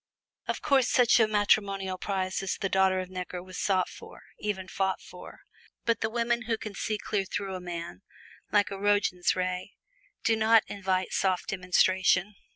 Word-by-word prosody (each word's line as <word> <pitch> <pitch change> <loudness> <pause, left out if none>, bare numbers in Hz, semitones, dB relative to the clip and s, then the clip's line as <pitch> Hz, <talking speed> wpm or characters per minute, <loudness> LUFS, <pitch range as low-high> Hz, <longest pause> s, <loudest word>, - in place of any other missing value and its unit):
Of - - -3
course 270 -3 +3
such 245 -1 +5
a 220 - +5
matrimonial 200 -3 +1
prize 190 -1 -2
as 195 - -2
the 195 - -1
daughter 190 -1 +3
of 185 0 -8
Necker 180 -1 -5
was 185 0 -8
sought 185 -3 +2
for, - - -12 0.2
even 195 -3 -3
fought 190 +1 -1
for. - - -12 0.4
But 230 -1 +1
the 220 - 0
women 235 +1 0
who 225 -1 +1
can 215 -1 -7
see 215 +2 -2
clear 205 -1 -1
through 195 0 -4
a 185 - -5
man, 170 - -6 0.5
like 205 0 +3
a 195 - -5
Roentgen 205 -3 +1
ray, 185 +1 -3 0.5
do 225 - +3
not 220 0 +5
invite 190 -2 -1
soft 185 -2 0
demonstration. 185 +1 +2
195 Hz, 170 wpm, -28 LUFS, 185-210 Hz, 0.5 s, such